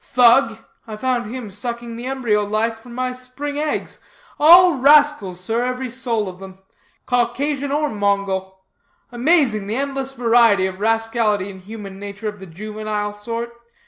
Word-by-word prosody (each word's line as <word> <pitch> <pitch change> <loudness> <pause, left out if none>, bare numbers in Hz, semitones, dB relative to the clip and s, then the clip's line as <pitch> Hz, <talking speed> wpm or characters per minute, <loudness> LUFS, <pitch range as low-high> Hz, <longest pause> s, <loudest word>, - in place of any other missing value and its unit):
Thug! 240 -1 +4 0.3
I 215 - -6
found 240 0 -1
him 240 -4 -7
sucking 235 +3 -5
the 240 +2 -6
embryo 240 -6 0
life 220 +2 -1
from 235 +1 -12
my 255 0 -1
spring 265 +3 -6
eggs. 305 0 -3 0.4
All 345 +1 +7
rascals, 285 -9 +4
sir, 225 +6 -2
every 250 0 -3
soul 230 -4 -1
of 185 -1 -8
them; 190 -1 -11 0.5
Caucasian 275 +4 -1
or 300 +1 +1
Mongol. 195 -4 -2 0.5
Amazing 245 - +2
the 215 - -2
endless 270 0 -3
variety 230 -5 +4
of 190 0 -5
rascality 225 -2 0
in 190 - -12
human 195 0 -9
nature 205 +1 -7
of 210 -1 -5
the 190 - -10
juvenile 210 +3 -4
sort. 230 +3 -5
230 Hz, 150 wpm, -20 LUFS, 205-255 Hz, 0.5 s, All